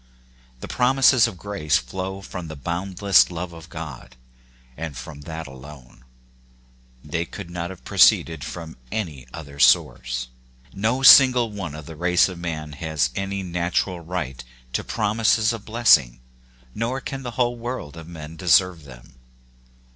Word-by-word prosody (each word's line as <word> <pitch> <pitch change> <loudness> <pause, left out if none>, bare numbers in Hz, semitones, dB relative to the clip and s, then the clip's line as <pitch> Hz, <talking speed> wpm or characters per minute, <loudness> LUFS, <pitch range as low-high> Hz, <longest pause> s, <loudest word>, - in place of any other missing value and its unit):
The - - -6
promises 130 -1 +4
of 105 -6 -8
grace 90 -6 0
flow 95 +1 -5
from 90 -3 -7
the 80 - -7
boundless 90 +6 +2
love 85 0 -6
of 85 0 -12
God: 80 -7 -9 0.6
and 75 -2 -6
from 70 +4 -9
that 80 0 -5
alone. 65 -2 -13 1.0
They 80 +3 -2
could 85 0 -9
not 85 0 -4
have 95 -2 -11
proceeded 80 -4 +4
from 80 -2 -8
any 80 -12 -4
other 70 -2 -10
source. 60 -2 +2 0.4
No 110 +7 -1
single 125 -3 +8
one 95 -7 -6
of 75 -1 -9
the 80 - -9
race 90 +2 +3
of 90 -3 -8
man 80 -3 -5
has 80 -1 -1
any 100 0 -3
natural 90 +1 -1
right 80 -7 -5 0.3
to - - -1
promises 110 +1 +1
of 110 -3 -8
blessing, 75 - +4 0.5
nor 120 +4 -2
can 135 +1 -6
the 120 -3 -7
whole 120 -1 +1
world 120 - -6
of 80 -1 -10
men 80 -2 -9
deserve 90 -1 +3
them. 65 -1 -15
85 Hz, 145 wpm, -23 LUFS, 75-105 Hz, 1.0 s, single